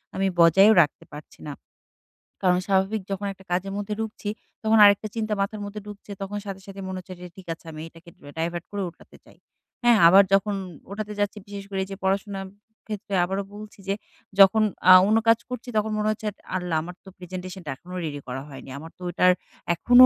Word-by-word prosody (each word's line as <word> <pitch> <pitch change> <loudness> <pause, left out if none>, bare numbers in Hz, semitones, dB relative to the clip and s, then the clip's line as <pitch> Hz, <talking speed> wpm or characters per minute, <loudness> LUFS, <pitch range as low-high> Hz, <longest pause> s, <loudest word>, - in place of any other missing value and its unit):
আমি 195 0 +1
বজায়ও 190 +6 +7
রাখতে 150 - -1
পারছি 150 0 -11
না। 145 - -4 0.9
কারণ 180 -1 +4
স্বাভাবিক 195 +2 +2
যখন 195 +1 -2
একটা 190 0 -19
কাজের 190 +2 -1
মধ্যে 205 +1 -3
ঢুকছি 220 -1 -4 0.3
তখন 220 0 +4
আরেকটা 205 +1 +6
চিন্তা 215 -1 -1
মাথার 205 +1 -2
মধ্যে 205 +1 -7
ঢুকছে, 205 0 -10
তখন 200 +1 -4
সাথে, 195 -1 -6
সাথে 195 0 -8
মনে 190 0 -4
হচ্ছে 185 +1 -10
যে - - -7
ঠিক 190 -2 -13
আছে 165 - -17
আমি 155 0 -8
এটাকে 165 +1 -16 0.3
ডাইভার্ট 170 +1 -2
করে 205 -1 -3
ওটাতে 170 - -19
যাই, - - -19 0.5
হ্যাঁ? 240 -2 +6
আবার 195 +3 +8
যখন 200 +1 +3 0.4
ওটাতে 210 +1 -4
যাচ্ছি 205 +1 0
বিশেষ 200 -1 -7
করে 195 - -3
এইযে 195 0 -7
পড়াশোনার 195 0 -1 0.4
ক্ষেত্রে 210 -1 -6
আবারও 195 +2 -1
বলছি 210 0 -11
যে 195 - +1 0.5
যখন 195 +3 +7 0.3
আ - - +12 0.2
অন্য 220 - +4
কাজ 230 0 +6
করছি 250 0 -6
তখন 215 +1 +1
মনে 210 0 0
হচ্ছে 215 0 -4 0.3
"আল্লাহ! 180 -3 -1
আমার 175 +2 -8
তো 190 - -10
প্রেজেন্টেশন 185 +1 -7
টা 145 - -5
এখনো 180 +6 -11
রেডি 145 -2 -4
করা 130 +1 -4
হয়নি, 135 -1 -10
আমার 160 +3 -9
তো - - -23
ওটার 180 +1 +4 0.4
এখনো 245 +8 +8
195 Hz, 200 wpm, -25 LUFS, 180-210 Hz, 0.9 s, আ